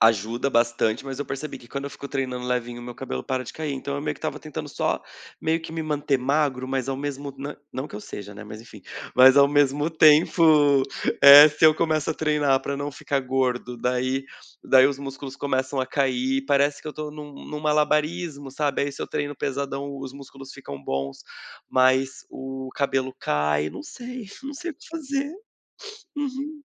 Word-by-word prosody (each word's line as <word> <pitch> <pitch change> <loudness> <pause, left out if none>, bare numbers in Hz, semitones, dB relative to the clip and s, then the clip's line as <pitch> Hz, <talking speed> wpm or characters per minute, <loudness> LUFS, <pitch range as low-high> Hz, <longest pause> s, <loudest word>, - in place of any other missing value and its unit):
ajuda 115 +4 +3
bastante, 115 0 +1
mas 135 -1 -6
eu 145 - -2
percebi 135 +3 -5
que 120 - -16
quando 140 +3 -5
eu 140 - -5
fico 140 - -8
treinando 130 -3 -3
levinho 120 -1 -2
o - - -9
meu 120 0 -7
cabelo 65 - -5
para 130 -1 -1
de 125 - -9
cair. 155 -2 -4
Então 140 +1 -4
eu - - -3
meio 150 0 -2
que - - -17
estava 150 - -3
tentando 155 0 -7
só, - - -1 0.4
meio 160 +1 +1
que 160 - -9
me 160 0 -3
manter 150 -2 0
magro 130 -1 0
mas 135 -1 -2
ao 135 - -1
mesmo 140 0 -5
na 140 +2 -6 0.2
não 130 +3 -4
que - - -8
eu - - -7
seja, 100 -1 -8
né, 105 +1 -10
mas 105 +1 -9
enfim, 115 -2 -13 0.3
mas 130 +1 +8
ao 140 0 +7
mesmo 145 +1 +2
tempo, 155 -3 +5 0.4
eh, 145 +2 +12
se 150 +1 +4
eu 155 - +6
começo 155 -2 0
a - - -2
treinar 150 -4 +2
para 140 - -3
não 145 +1 -4
ficar 140 0 -2
gordo, 125 -1 -1
daí 125 +2 -1 0.4
daí 130 0 +6
os 140 -1 -2
músculos 135 -1 -7
começam 130 -1 -1
a 130 - -1
cair, 135 0 0
parece 140 +1 +2
que - - -13
eu - - -5
tô 155 0 -5
em 150 - -12
um 145 -1 -9
em - - -9
um 150 - -4
malabarismo, 150 0 0
sabe? 145 -1 0
Aí, 140 0 -2
se - - -6
eu - - -4
treino 145 0 -3
pesadão 140 +1 -3
os 135 -1 -7
músculos 135 -1 -11
ficam 70 - -9
bons, 70 0 -3 0.5
mas 130 +1 +2
o 130 0 -6
cabelo 135 -2 0
cai, 75 0 0
não - - -8
sei, 250 -5 -8 0.2
não 280 +1 -5
sei 345 +4 -5
o - - -10
que - - -17
fazer. 285 -3 -3 0.8
Uhum. 290 +1 -4
140 Hz, 205 wpm, -24 LUFS, 130-150 Hz, 0.8 s, eh